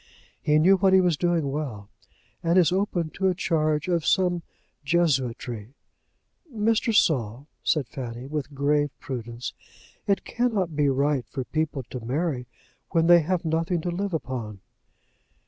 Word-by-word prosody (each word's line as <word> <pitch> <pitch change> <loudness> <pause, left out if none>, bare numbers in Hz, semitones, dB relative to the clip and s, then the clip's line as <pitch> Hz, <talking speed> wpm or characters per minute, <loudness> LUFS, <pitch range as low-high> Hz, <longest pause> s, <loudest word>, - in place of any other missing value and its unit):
He 150 0 +3
knew 185 +5 +5
what 190 0 +3
he 190 - +7
was 180 -3 +3
doing 165 -3 0
well, 130 -9 -4 0.5
and 170 +2 +2
is 175 -2 +5
open 180 -4 0
to 190 - 0
a 185 - +2
charge 155 -4 0
of 170 -3 +1
some 180 -1 +2 0.4
jesuitry. 130 -7 0 0.8
"Mr. 225 0 +1
Saul," 130 - +2 0.2
said 150 -6 +1
Fanny, 120 -1 -6
with 145 0 -5
grave 145 +1 +2
prudence, 120 -2 -6 0.5
"it 200 -1 +1
cannot 210 -9 -1
be 145 -1 +3
right 140 -1 +1
for 135 - -4
people 155 -1 -2
to 125 - -4
marry 130 0 -2 0.4
when 165 -2 +2
they 175 0 +8
have 170 +2 -1
nothing 165 +2 0
to 175 - -2
live 190 0 -2
upon." 120 -8 -5
155 Hz, 145 wpm, -25 LUFS, 135-175 Hz, 0.8 s, they